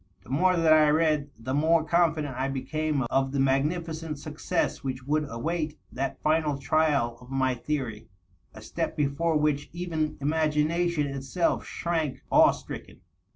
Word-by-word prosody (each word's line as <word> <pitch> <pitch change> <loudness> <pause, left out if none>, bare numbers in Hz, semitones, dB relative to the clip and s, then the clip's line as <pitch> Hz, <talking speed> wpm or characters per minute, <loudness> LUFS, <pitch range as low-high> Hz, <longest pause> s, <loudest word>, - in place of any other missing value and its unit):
The 115 - -12
more 180 +6 +3
that 165 -1 +5
I 155 -1 +6
read, 150 -2 +2
the 130 +4 -4
more 160 +3 +3
confident 155 -4 +1
I 130 +2 -1
became 145 +2 -1
of 135 0 +1
the 140 - -1
magnificent 155 +3 0
success 155 +4 -2
wliich 130 -2 -5
would 150 +1 0
await 155 +5 -3
that 135 +1 -3
final 155 -2 +2
trial 140 -4 +1
of 125 - -14
my 130 -1 +1
theory 120 -5 -4 0.2
— 90 - -38
a - - -11
step - - -3
before 150 +3 +1
which 150 -1 0
even 165 -3 -2
inu^nation 155 +2 +1
itself 140 +6 -1
shrank 165 -5 -2
awe - - +7
stricken. - - -7
150 Hz, 155 wpm, -27 LUFS, 135-160 Hz, 0.2 s, awe